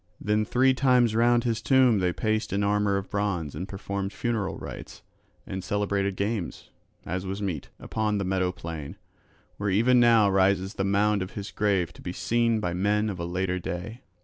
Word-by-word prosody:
Then 105 +1 +1
three 130 +4 +3
times 125 -4 +3
round 120 +1 +3
his 115 -2 -1
tomb 125 -2 +4
they 90 -1 +1
paced 110 +4 -1
in 100 +2 0
armour 100 0 +2
of 100 - -6
bronze 95 -8 -1
and 90 +6 -5
performed 100 0 -4
funeral 115 -3 -2
rites - - -9 0.4
and 95 -1 -5
celebrated 100 0 -1
games, 100 -2 -3 0.3
as 90 +3 -3
was 95 +2 -4
meet, 90 -8 -4
upon 105 -1 -1
the 100 - -1
meadow 95 -1 0
plain, 85 -4 -7 0.6
where 100 0 -1
even 115 +6 +4
now 115 -3 +5
rises 95 0 +2
the 95 - -2
mound 100 +1 +2
of 95 - -5
his 100 0 -6
grave 100 -5 0
to - - -15
be 90 - -5
seen 115 +2 +1
by 90 -5 -2
men 105 +3 +1
of 95 - -7
a 85 - -3
later 90 +1 -1
day. 100 +8 -6
100 Hz, 185 wpm, -26 LUFS, 95-110 Hz, 0.6 s, now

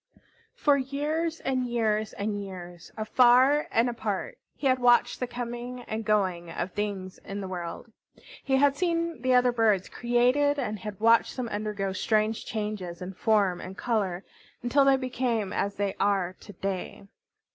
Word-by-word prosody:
For 290 -1 +3
years 305 +5 -2
and 255 -2 -1
years 220 -3 0
and 205 0 -3
years, 175 -3 -9
afar 255 +6 +4
and 230 +2 +3
apart, 220 -5 -3 0.2
he - - -7
had 260 -1 +3
watched 245 -1 +4
the 250 - -2
coming 245 +1 -5
and 220 -1 -4
going 190 -5 0
of 175 +2 -4
things 200 -2 -4
in 200 +1 -7
the 195 - -5
world. 180 +4 -6 0.5
He 265 - +1
had 280 0 +4
seen 335 -3 -1
the 255 0 +3
other 250 0 +5
birds 220 -5 +2
created, 250 +5 +2
and 215 -6 -3
had 210 -3 -7
watched 230 +3 +4
them 245 -2 -3
undergo 205 -2 -2
strange 215 +2 0
changes 210 -5 -4
in 185 +1 -6
form 195 -3 +2
and 190 +1 -8
color 200 -6 -1 0.4
until 275 +3 +3
they 270 -1 +5
became 245 -6 -1
as 200 0 -1
they 200 -1 -1
are 195 -3 +1
to 205 - -12
day. 195 +1 -4
220 Hz, 160 wpm, -27 LUFS, 195-250 Hz, 0.5 s, other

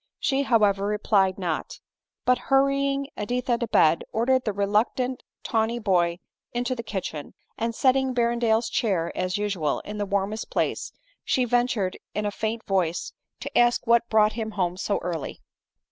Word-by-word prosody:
She, 270 -1 +1
however, 205 -6 +2
replied 205 -2 +2
not; 175 -5 -3 0.5
but, 250 0 +3
hurrying 275 0 +2
Editha 245 +2 -1
to 235 - -2
bed, 160 -5 +4
ordering 255 +3 +2
the 215 - -1
reluctant 215 +6 0 0.2
tawny 225 +1 0
boy 175 -6 +1 0.4
into 245 +1 -1
the 240 - -4
kitchen, 190 -9 -5 0.2
and 230 +1 -2
setting 265 +1 +3
Berrendale's 235 -2 +1
chair, 180 -7 -1
as 185 +1 -1
usual, 195 -8 -1
in 210 0 -7
the 205 - -1
warmest 200 +2 -2
place, - - -1 0.3
she 255 - +1
ventured 240 -6 0 0.2
in 210 +1 -1
a 205 - 0
faint 220 +2 -3
voice 180 -4 -1 0.3
to - - -7
ask 240 0 +3
what 235 0 +3
brought 215 -1 +4
him 220 -1 -3
home 180 -2 0
so 200 +2 -1
early. 165 -5 -4
220 Hz, 155 wpm, -25 LUFS, 195-245 Hz, 0.5 s, bed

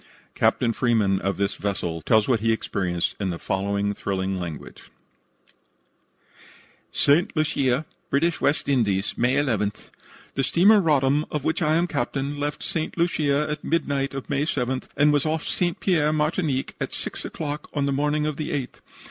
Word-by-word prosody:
Captain 115 -2 +2
Freeman, 110 -6 +2
of 95 -1 -1
this 100 0 0
vessel, 90 -5 -2
tells 110 +4 +3
what 125 -4 +2
he 115 +1 +1
experienced 90 -5 -1
in 100 -2 -1
the 85 - -3
following 100 +3 -1
thrilling 95 -1 -2
language: 85 -4 -8 2.0
"St. 165 +8 +3
Lucia, 145 -2 +1 0.2
British 165 +4 +1
West 145 - +1
Indies, 110 -8 +1
May 125 +3 +2
11. 110 -8 +1 0.6
The 135 - 0
steamer 200 +9 +5
Roddam, 145 -2 +2
of 150 -3 -3
which 160 - 0
I 155 -1 +3
am 170 +2 +3
captain, 140 -1 -2
left 145 +1 -3
St. 165 -4 -3
Lucia 150 -4 +1
at 150 0 -4
midnight 140 -4 -1
of 135 - -5
May 145 +1 0
7, 130 -4 -1 0.2
and 150 +1 +5
was 145 +1 +2
off 160 0 -1
St. 175 -2 0
Pierre, 160 -6 +2
Martinique, 150 -2 0
at - - -3
6 - - -5
o'clock 150 -1 -5
on 140 -1 +1
the 140 - 0
morning 150 +2 +1
of 150 -2 -2
the 155 - -3
8th. 135 -4 -4
140 Hz, 165 wpm, -24 LUFS, 110-150 Hz, 2.0 s, steamer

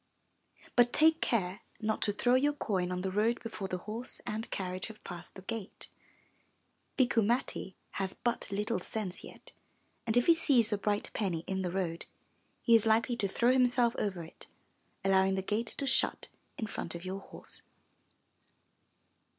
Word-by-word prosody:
But 240 -1 +5
take 320 +1 +5
care 195 -2 0 0.2
not 215 0 -1
to 210 - +3
throw 245 +4 +2
your 285 +3 +4
coin 190 -10 -1
on 180 0 -2
the 190 - -1
road 220 +4 +2
before 220 -4 -4
the 185 - -2
horse 220 +7 -5
and 220 +2 -3
carriage 185 -1 -3
have 220 -1 -12
passed 175 -1 -8
the 190 - -10
gate; 220 -1 -6 1.1
Bikku 245 -4 +4
Matti 220 -4 0 0.2
has 190 -1 -2
but 240 -1 -1
little 210 +1 0
sense 190 -1 -4
yet, - - -12 0.6
and 225 +1 +2
if 245 - +4
he 335 - +8
sees 275 -9 +4
the 205 - 0
bright 205 0 -1
penny 175 -6 -1
in 190 0 -2
the 180 - -1
road, 175 -2 -2 0.6
he 235 - +4
is 225 -1 +6
likely 230 +2 +3
to 205 - +1
throw 235 +5 +3
himself 245 -2 +4
over 190 -5 -2
it, 160 - -10 0.6
allowing 190 0 +4
the 190 - -1
gate 220 +4 -1
to 280 - -3
shut - - +1 0.3
in 220 - -2
front 175 -5 -5
of 170 +2 -7
your 190 +1 -3
horse. - - -7
210 Hz, 170 wpm, -32 LUFS, 190-235 Hz, 1.1 s, he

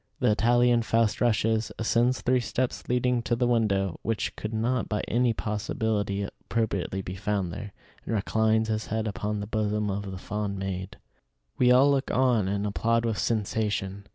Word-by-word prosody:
The - - +3
Italian 120 +2 +3
Faust 115 -1 +1
rushes, 110 -1 +1
ascends 120 +3 +1
three 125 0 +2
steps 125 +1 -2
leading 125 0 +2
to 120 0 0
the 125 +1 +1
window, 100 -6 +1
which 115 0 -2
could 105 - -5
not 115 +3 -1
by 105 - 0
any 120 +1 +2
possibility 105 -2 -2
appropriately 100 -3 -2
be 90 - -5
found 95 -2 -2
there, 105 +2 -7 0.3
and 115 - -1
reclines 110 +2 +2
his 110 0 -2
head 110 +1 -1
upon 105 +1 -3
the - - -4
bosom 105 -1 -1
of 100 0 -4
the 95 - -6
fond 100 +1 -3
maid. 95 0 -4 0.6
We 125 -1 +5
all 135 +3 +6
look 135 -1 0
on 125 -6 +2
and 100 +1 -1
applaud 115 +3 +1
with 110 -3 -1
"sensation." 105 -3 -1
110 Hz, 170 wpm, -27 LUFS, 100-115 Hz, 0.6 s, all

